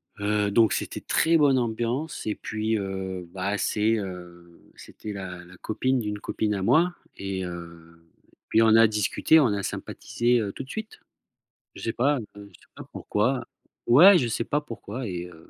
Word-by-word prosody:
heu, 105 0 0
donc 110 -3 +4
c'était - - -3
très 165 +1 +2
bonne 140 -4 +4
ambiance 120 +6 -2
et 105 - -1
puis, 110 +1 -2
heu, 95 -2 -5
bah, 100 +2 -2
c'est, 110 +2 +1
heu, 85 -3 -9
c'était 105 - -9
la 90 -3 -7
la 90 +1 -15
copine 130 +6 -1
d'une 105 -2 -3
copine 105 0 -2
à 95 - -3
moi 175 - +3 0.2
et 95 -1 -4
heu, 85 -1 -10 0.5
puis 110 - +4
on 110 -1 +5
a 115 0 +7
discuté, 105 +9 +3
on 140 - +4
a 100 -2 -1
sympathisé, 120 +4 -1
heu, 105 -3 -2
tout - - -6
de 130 - -16
suite. 220 0 -7 0.8
Je - - -10
sais 115 - -1
pas, 140 +3 +1 0.2
je 105 - -10
sais 100 -4 -16
pas - - -9
pourquoi, - - -1 0.4
ouais, 180 +11 +8
je 125 - 0
sais 115 0 -2
pas 150 +5 -1
pourquoi 120 -2 -7
et 90 -2 -4
heu 80 -2 -16
105 Hz, 180 wpm, -25 LUFS, 95-120 Hz, 0.8 s, ouais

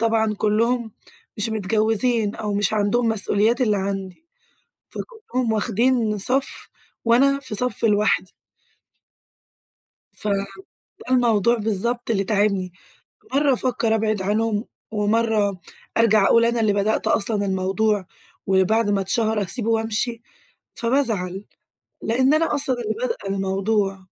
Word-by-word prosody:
طبعًا 220 -1 +1
كلّهم 225 +2 0 0.4
مش 210 +1 -1
متجوّزين 220 +1 0
أو 210 -1 -3
مش 205 0 0
عندهم 215 +3 +1
مسئوليات 220 +2 +1
اللي 215 -5 +2
عندي، 195 - -4 0.6
فكلّهم 255 - -4
واخدين 225 0 +1
صَف 265 +7 -2 0.4
وأنا 275 +4 +4
في 240 -6 -7
صَف 250 +1 -2
لوحدي. 210 -1 +2 1.8
ف 210 - -7 0.7
ده 255 - 0
الموضوع 235 -1 +3
بالضبط 225 +3 -2
اللي 200 -2 +1
تاعبني، 200 -3 0 0.6
مرَّة 280 0 +3
أفكّر 235 -3 0
أبعِد 215 -2 0
عنهم، 215 +2 0 0.3
ومرَّة 210 -2 +1 0.4
أرجَع 220 -3 +4
أقول 230 0 +5
أنا 235 0 +1
اللي 215 -2 +2
بدأت 205 +2 0
أصلًا 205 -1 +1
الموضوع، 195 +1 0 0.4
وبعد 200 +3 +2
ما 200 -1 +1
اتشَهر 220 +2 0
أسيبه 225 +4 -3
وأمشي، 225 +1 -1 0.5
فبازعَل، 220 -7 -1 0.6
لأن 260 +6 +2
أنا 320 -1 +1
أصلًا 265 -3 0
اللي 220 - -2
بادئة 465 - -3
الموضوع. 195 +1 0
220 Hz, 115 wpm, -22 LUFS, 205-235 Hz, 1.8 s, أقول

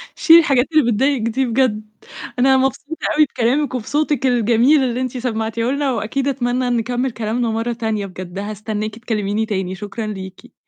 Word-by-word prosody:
شيلي 330 0 +7
الحاجات 275 -6 +3
اللي 290 -7 +3
بتضايقِك 265 +3 +1
دي 230 +4 0
بجد. 225 -3 0 0.5
أنا 265 +1 +5
مبسوطة 270 +4 -2
أوي 305 - +5
بكلامِك 260 +2 0
وبصوتِك 290 +3 -1
الجميل 245 +4 +3
اللي 250 0 -1
أنتِ 255 0 -3
سمعتيه 230 -1 -2
لنا، 280 -1 0
وأكيد 245 +5 -2
أتمنى 250 -2 0
إن 240 -1 +1
نكمل 245 +3 -1
كلامنا 225 +1 -2
مرّة 225 +2 -1
تانية 220 -3 -2
بجد 185 0 -8
هاستناكِ 215 +1 -4
تكلميني 215 -2 -1
تاني. 190 -3 -3
شكرًا 210 +2 -6
ليكِ. 190 -2 -8
235 Hz, 165 wpm, -19 LUFS, 215-265 Hz, 0.5 s, شيلي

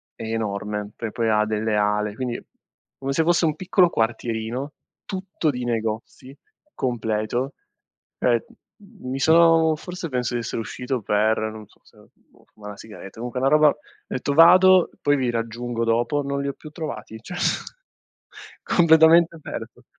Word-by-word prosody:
è - - -9
enorme. 105 -2 -3
Poi 115 -2 -5
poi 115 0 -1
ha 105 0 +3
delle 110 0 -1
ale, 105 0 0
quindi 125 -1 -4 0.6
come 135 0 -3
se 160 - +2
fosse 170 +1 +2
un 155 -2 0
piccolo 180 +1 +3
quartierino 115 +2 -2 0.3
tutto 190 -4 -3
di 125 -3 -3
negozi, 115 +3 -4 0.4
completo. 120 +1 -2 0.7
Ehm, 120 -2 +2 0.6
mi 130 +1 -4
sono 165 +1 +5
forse 180 +2 -7
penso 125 -3 -2
di 120 - -1
essere 115 0 -4
uscito 125 +2 -4
per, 105 +2 +1
non 110 -1 -5
so - - -27
se, - - -24 0.2
boh, - - -28
fuma' 105 -1 -10
'na 100 - -9
sigaretta. 105 -3 -11
Comunque 120 +2 -4
è - - -3
'na 135 - +4
roba 150 +1 +5
ho 145 - -3 0.3
etto: 130 +2 -2
"Vado, 185 +3 +7
poi 145 0 +2
vi 130 -2 0
raggiungo 115 +1 -3
dopo." 120 +5 +1
Non 140 0 -2
li 140 - -3
ho - - -4
più 155 - -12
trovati 150 -8 -7
cioè, 180 +10 -8 1.3
completamente 165 0 +5
perso. - - -8
125 Hz, 160 wpm, -23 LUFS, 110-155 Hz, 1.3 s, Vado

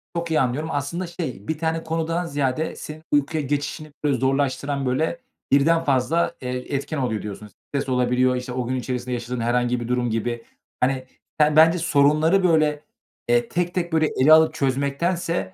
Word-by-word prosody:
Çok 170 -1 -3
iyi 155 - +3
anlıyorum. 135 +6 -1
Aslında 155 +6 -3
şey 150 - -6
bir 160 - -1
tane 160 0 -1
konudan 165 +2 -1
ziyade 145 0 -1
senin 155 +1 -9
uykuya 145 +1 +1
geçişini, 145 +2 -3
böyle, 140 -3 +2
zorlaştıran, 135 +1 0
böyle, 160 - -1 0.3
birden 165 +4 +4
fazla, 150 +5 +1
eee, 125 +2 -4
etken 145 +3 -3
oluyor 120 -5 -1
diyorsun. 105 0 -7
Stres 135 +5 -6
olabiliyor. 125 0 +2
İşte, 125 0 -5
o 125 -1 -3
gün 130 - -1
içerisinde 125 0 -3
yaşadığın 120 +1 -4
herhangi 120 +1 +1
bir 120 - -5
durum 125 -1 0
gibi. 115 +1 -2 0.3
Hani, 130 0 0 0.3
sen 150 0 +4
bence 165 +3 +6
sorunları, 160 +4 +3
böyle, 155 -3 +2 0.4
eee, 240 -1 +2
tek 175 -2 -1
tek 175 -2 -2
böyle 155 -1 +3
ele 155 +4 +7
alıp 160 0 +6
çözmektense 145 +7 -1
145 Hz, 170 wpm, -23 LUFS, 125-160 Hz, 0.4 s, ele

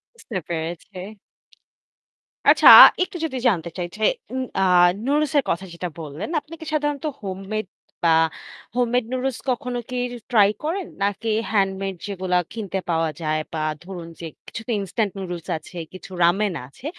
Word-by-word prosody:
বুঝতে 240 - -10
পেরেছি। 170 +3 -5 1.5
আচ্ছা - - +6 0.4
একটু 365 - -6
যদি 265 -5 -4
জানতে 175 -7 +1
চাই 175 -1 -2
যে, - - -11 0.3
উম 260 0 -1
অ্যাঁ 180 -2 +5 0.2
নুডলসের 290 0 +2
কথা 180 +3 -1
যেটা 175 +1 -4
বললেন, 155 - -6
আপনি 300 +2 -15
কি 320 - -9
সাধারণত 295 0 -1 0.2
হোমমেড 195 +2 -4 0.4
বা 170 - +4 0.7
হোমমেড 245 0 +2
নুডলস 255 -1 -1
কখনো 250 -1 -2
কি 250 - -5 0.2
র - - -5 0.2
ট্রাই 210 -4 +6
করেন? 350 +5 -2 0.2
নাকি 205 +3 -1 0.2
হ্যান্ডমেড 195 -2 0
যেগুলো 185 -2 -2 0.2
কিনতে 200 -4 -3
পাওয়া 165 -1 +1
যায় 155 -1 0 0.2
বা 160 - -2 0.2
ধরুন 175 -2 -8
যে 170 - -6 0.2
কিছু - - -6
তো - - -2
ইনস্ট্যান্ট 200 +2 -1
নুডলস 175 -3 -6
আছে, 175 +3 -12 0.2
কিছু 185 - -10
রামেন 190 +3 +3
আছে। 140 - -16
195 Hz, 150 wpm, -23 LUFS, 175-250 Hz, 1.5 s, আচ্ছা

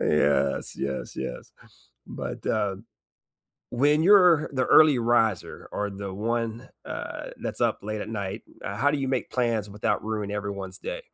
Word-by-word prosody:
Yes, 70 -2 +2
yes, 70 -1 -4
yes, - - -6 0.5
but, - - -6
uh, 105 -3 0 1.0
when 145 +5 +3
you're 180 -5 +6
the 130 -2 +1
early 155 -4 +7
riser 115 -5 +1
or 105 0 -1
the 100 0 -6
one, 115 +3 -2 0.2
uh, - - -6
that's - - -4
up - - +2
late 110 +1 -3
at - - -7
night, 100 -1 -4 0.2
uh, 100 - -4
how 140 +7 +3
do 145 - 0
you 135 -1 -1
make 130 -1 -1
plans 115 -5 0
without 105 +1 -1
ruining 105 -2 -3
everyone's 100 -2 -4
day? - - -5
110 Hz, 155 wpm, -26 LUFS, 100-130 Hz, 1.0 s, early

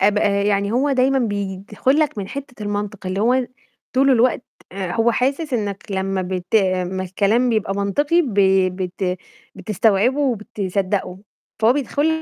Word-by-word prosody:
آب 205 +2 +3
آآ، 200 -1 +2
يعني 200 0 +1
هو 275 +4 +1
دايمًا 265 +1 +3
بيدخل 205 +4 -1
لك 295 -8 +1
من 190 -1 -4
حِتّة 275 -6 -8
المنطق، 205 -1 -4
اللي 190 +2 -2
هو 250 +2 +2 0.5
طول 270 +2 +3
الوقت 250 0 +3 0.3
آآ 190 -2 -4
هو 230 +1 +2
حاسس 275 +4 -1
إنّك 205 -3 -3
لمّا 190 0 -1
بت 180 +1 -5
آآ 185 -3 +3
لمّا 185 +1 -3
الكلام 210 +7 +1
بيبقى 215 -3 0
منطقي 290 - +2
ب 245 -9 -4 0.4
بت 180 0 -2 0.4
بتستوعبه 215 +6 +1
وبتصدقه، 200 -6 -2 0.4
فهو 225 +2 +4
بيدخل 290 +2 0
210 Hz, 150 wpm, -20 LUFS, 195-255 Hz, 0.5 s, فهو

